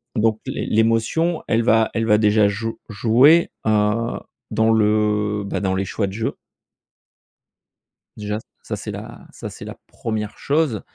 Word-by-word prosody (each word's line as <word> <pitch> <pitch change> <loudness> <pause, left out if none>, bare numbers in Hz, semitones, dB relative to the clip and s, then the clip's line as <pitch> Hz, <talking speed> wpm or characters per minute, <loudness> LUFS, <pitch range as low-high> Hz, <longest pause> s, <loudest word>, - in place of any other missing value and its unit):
donc 110 -1 +1
l'é - - -3
l'émotion 115 +10 +1
elle 115 +1 +2
va 110 -1 +3
elle 115 0 0
va 105 -1 +4
déjà 105 -1 +4
jou 110 +3 -4
jouer 125 +10 +4 0.2
heu, 110 +2 +1 0.3
dans 110 0 +2
le 105 -1 +1
bah, 100 - -3
dans 95 -2 0
les 95 +1 -1
choix 100 +2 -2
de 95 - -7
jeu 110 +2 -3 1.8
déjà 105 0 -3 0.3
ça - - -4
c'est - - -6
la - - -9
ça - - -8
c'est - - -10
la - - -8
1re 110 -2 -4
chose. 140 -7 0
110 Hz, 155 wpm, -21 LUFS, 105-115 Hz, 1.8 s, va